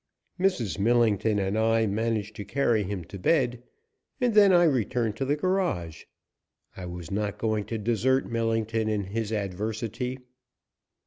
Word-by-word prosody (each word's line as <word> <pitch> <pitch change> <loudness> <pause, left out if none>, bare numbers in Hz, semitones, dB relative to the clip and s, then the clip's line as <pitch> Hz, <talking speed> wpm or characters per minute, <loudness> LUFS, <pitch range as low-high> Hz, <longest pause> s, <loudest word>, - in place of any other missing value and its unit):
Mrs. 180 - 0
Millington 110 -1 +2
and 100 0 -1
I 115 0 +2
managed 110 0 -1
to 105 - -5
carry 115 0 +1
him 100 -2 -4
to 95 +4 -10
bed, 125 - +1 0.6
and 245 -3 +1
then 205 -2 +7
I 175 -1 +6
returned 120 - +1
to 135 - -1
the 145 +2 +1
garage. 160 - -1 0.7
I 90 -1 -7
was 85 -2 -8
not 105 0 -2
going 110 -2 -1
to 115 - -4
desert 120 +5 +1
Millington 115 -1 -1
in 105 -2 0
his 110 +3 -3
adversity. 110 +5 -3
110 Hz, 145 wpm, -27 LUFS, 105-125 Hz, 0.7 s, then